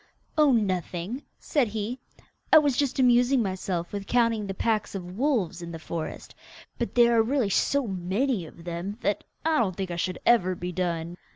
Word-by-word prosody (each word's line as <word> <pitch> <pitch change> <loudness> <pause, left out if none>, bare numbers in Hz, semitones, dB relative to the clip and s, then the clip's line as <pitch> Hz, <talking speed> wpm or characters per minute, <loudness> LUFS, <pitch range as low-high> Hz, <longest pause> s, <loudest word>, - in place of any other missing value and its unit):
'Oh, 305 -3 +5
nothing,' 195 +1 -1 0.2
said 280 -6 +1
he, 220 +4 -4 0.5
'I - - +10
was 290 -4 +4
just 280 -1 0
amusing 250 0 +4
myself 185 -3 -3
with 200 -1 -4
counting 230 -4 +2
the 195 - -4
packs 215 0 0
of 180 -1 -6
wolves 220 - 0
in 170 0 -6
the 165 - -6
forest, 160 0 -6 0.5
but 235 - -3
there 235 -1 +5
are 225 - +6
really 235 -2 +1
so 280 +7 +2
many 190 +2 -1
of 165 - -14
them 175 +4 -5
that 205 - 0 0.2
I 320 -3 +3
don't 190 -6 +1
think 190 -1 -4
I 170 - -3
should 180 +1 -2
ever 185 -6 +4
be 180 +1 -5
done. 170 -1 -2
205 Hz, 185 wpm, -27 LUFS, 180-245 Hz, 0.5 s, I